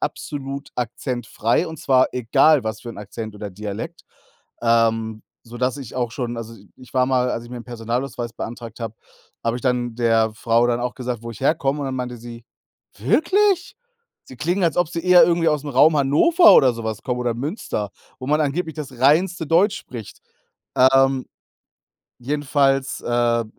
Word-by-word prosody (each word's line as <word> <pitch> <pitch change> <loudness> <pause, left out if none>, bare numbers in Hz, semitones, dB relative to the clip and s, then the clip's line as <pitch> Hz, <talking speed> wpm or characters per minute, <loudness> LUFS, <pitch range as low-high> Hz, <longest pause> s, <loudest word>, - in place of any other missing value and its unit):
absolut 140 -2 -5
akzentfrei, 120 +2 -1
und 160 -2 -8
zwar 130 -1 +3
egal 125 +3 +3
was 110 0 -3
für 120 - -7
'n - - -10
Akzent 105 +1 -7
oder 105 0 -6
Dialekt,“ 105 - -7 0.6
ähm, 115 -1 +1 0.2
sodass 125 +3 -2
ich 130 -5 -9
auch 120 -2 -1
schon 120 -2 -4
also, 115 0 -7 0.2
ich 125 - -16
war 130 -1 +3
mal 125 -1 +1
als 115 - -3
ich 120 - -13
mir 125 - -6
'n 120 - -10
Personalausweis 120 +1 -4
beantragt 115 -1 -7
habe, 115 -2 -5 0.5
habe 115 +1 0
ich 125 - -8
dann 125 -2 0
der 115 -2 +2
Frau 115 +2 +2
dann 120 0 0
auch 125 0 -3
gesagt, 125 -3 -4
wo 115 - -6
ich 110 - -11
herkomme 140 0 +1
und 140 - -3
dann 130 -1 -3
meinte 125 -1 -4
sie: 115 0 -10 0.5
„Wirklich? 365 - +2 0.5
Sie 130 - -13
klingen, 175 +8 -1
als 165 -3 +1
ob 175 -2 +2
Sie 165 0 -5
eher 180 -2 +7
irgendwie 170 -1 +2
aus'm 150 -1 -2
Raum 150 +5 +5
Hannover 240 - +5
oder 130 -2 +6
so 115 -1 -7
was 110 -2 -4
kommen 125 -1 -2
oder 120 -2 -1
Münster, 125 - -4 0.3
wo 130 - -6
man 150 +1 +2
angeblich 155 +2 -1
das 135 -5 -7
reinste 160 +5 +3
Deutsch 195 +5 +3
spricht.“ 115 -5 -9 0.6
Ähm, 135 0 +4 0.9
jedenfalls, 135 0 0
äh, 120 -1 +1
125 Hz, 175 wpm, -21 LUFS, 115-145 Hz, 0.9 s, eher